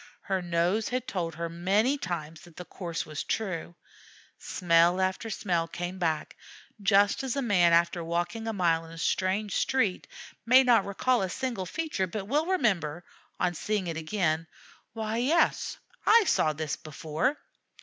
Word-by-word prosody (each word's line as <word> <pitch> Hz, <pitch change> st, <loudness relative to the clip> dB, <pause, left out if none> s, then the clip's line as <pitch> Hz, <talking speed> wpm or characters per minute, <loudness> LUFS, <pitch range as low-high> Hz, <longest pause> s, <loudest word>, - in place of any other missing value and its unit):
Her 190 Hz, -1 st, -1 dB
nose 175 Hz, +5 st, 0 dB
had 250 Hz, 0 st, -2 dB
told 170 Hz, -4 st, -3 dB
her 170 Hz, +1 st, -3 dB
many 195 Hz, +10 st, +1 dB
times 165 Hz, -, -5 dB
that 170 Hz, -2 st, -16 dB
the 180 Hz, -, -8 dB
course 170 Hz, -3 st, -5 dB
was 155 Hz, -2 st, -5 dB
true. 180 Hz, -5 st, -3 dB, 0.6 s
Smell 175 Hz, 0 st, +3 dB
after 190 Hz, +4 st, -1 dB
smell 175 Hz, -6 st, -1 dB
came 175 Hz, +2 st, -5 dB
back, 160 Hz, -3 st, -1 dB, 0.5 s
just 200 Hz, 0 st, +4 dB
as 265 Hz, -2 st, -2 dB
a 275 Hz, -, 0 dB
man 180 Hz, -7 st, +4 dB
after 170 Hz, +1 st, +3 dB
walking 175 Hz, +7 st, -2 dB
a -, -, 0 dB
mile 170 Hz, -5 st, +1 dB
in 165 Hz, 0 st, -12 dB
a -, -, -10 dB
strange 190 Hz, +4 st, 0 dB
street 225 Hz, -9 st, 0 dB, 0.4 s
may 255 Hz, +3 st, +6 dB
not 235 Hz, -6 st, +4 dB
recall 240 Hz, +5 st, +1 dB
a 190 Hz, -, -1 dB
single 235 Hz, -4 st, -3 dB
feature, 310 Hz, -, -2 dB
but 195 Hz, +2 st, -5 dB
will 300 Hz, +7 st, +1 dB
remember, 180 Hz, -, 0 dB, 0.4 s
on 180 Hz, -1 st, +1 dB
seeing 205 Hz, +3 st, -2 dB
it 165 Hz, -2 st, -3 dB
again, 160 Hz, -1 st, -1 dB, 0.5 s
"Why, 220 Hz, 0 st, -3 dB
yes, 285 Hz, +8 st, +1 dB, 0.3 s
I 455 Hz, +1 st, +6 dB
saw 155 Hz, -, +2 dB
that 155 Hz, -1 st, -3 dB
before." 155 Hz, -, -2 dB
185 Hz, 160 wpm, -28 LUFS, 170-225 Hz, 0.6 s, may